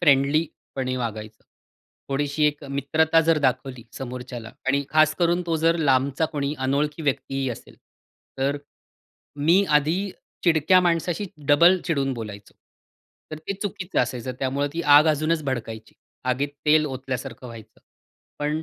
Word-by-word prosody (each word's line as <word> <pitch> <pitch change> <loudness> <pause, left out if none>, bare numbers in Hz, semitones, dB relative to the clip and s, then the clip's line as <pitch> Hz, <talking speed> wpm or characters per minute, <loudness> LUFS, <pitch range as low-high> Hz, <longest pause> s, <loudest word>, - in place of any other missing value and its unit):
फ्रेंडलीपणे 140 -3 +1
वागायचं. 110 -3 -5 0.7
थोडीशी 145 +2 0
एक 150 0 -2
मित्रता 145 +4 +2
जर 165 -1 +4
दाखवली 130 -2 -1
समोरच्याला, 125 -3 -7
आणि 140 +1 +1
खास 155 0 +4
करून 175 +1 +2
तो 165 -1 +1
जर 165 +1 +2
लांबचा 140 0 +2
कोणी 145 -1 -2
अनोळखी 145 +4 -1
व्यक्तीही 135 -1 -1
असेल, 115 - -10 0.6
तर 140 +2 +1 0.8
मी 170 +7 +4
आधी 165 +7 +2 0.3
चिडक्या 170 +2 +4
माणसाशी 175 +2 0 0.2
डबल 170 +6 +6
चिडून 140 -4 0
बोलायचो, 105 -3 -8 0.8
तर 155 - -6
ते 160 +5 -4
चुकीचं 200 -2 -2
असायचं. 125 0 -3
त्यामुळं 140 +2 -1
ती 170 +2 -3
आग 155 +2 +6
अजूनच 155 +1 +1
भडकायची, 115 -4 -5 0.3
आगीत 130 +3 0 0.2
तेल 155 0 +5
ओतल्यासारखं 130 -2 -5
व्हायचं. 115 -2 -12 0.6
पण 150 +2 -1
145 Hz, 130 wpm, -24 LUFS, 130-160 Hz, 0.8 s, डबल